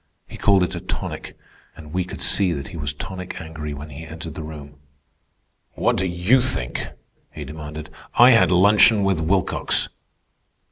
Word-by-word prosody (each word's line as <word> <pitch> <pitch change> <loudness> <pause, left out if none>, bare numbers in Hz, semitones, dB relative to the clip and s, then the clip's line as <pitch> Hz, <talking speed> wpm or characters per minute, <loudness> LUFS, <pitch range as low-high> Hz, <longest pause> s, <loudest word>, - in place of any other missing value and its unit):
He - - -11
called 100 -3 +3
it 90 - -2
a - - -4
tonic. - - -5 0.4
And 75 0 -11
we 90 0 0
could - - -8
see 95 -4 +4
that 70 -3 -6
he - - -10
was 75 -3 -2
tonic 90 +5 -7
angry 80 -2 -7
when 75 +2 -9
he 70 +4 -9
entered 80 0 -8
the 80 - -7
room. 75 -2 -9 1.0
"What - - +1
do 95 - 0
you 90 +9 +3
think?" 70 - -3 0.4
he 75 - -7
demanded. 75 +1 -8 0.2
"I 120 +2 +8
had 115 - +5
luncheon 100 +3 +5
with 95 -4 +1
Wilcox." 90 +2 +1
80 Hz, 170 wpm, -22 LUFS, 75-95 Hz, 1.0 s, I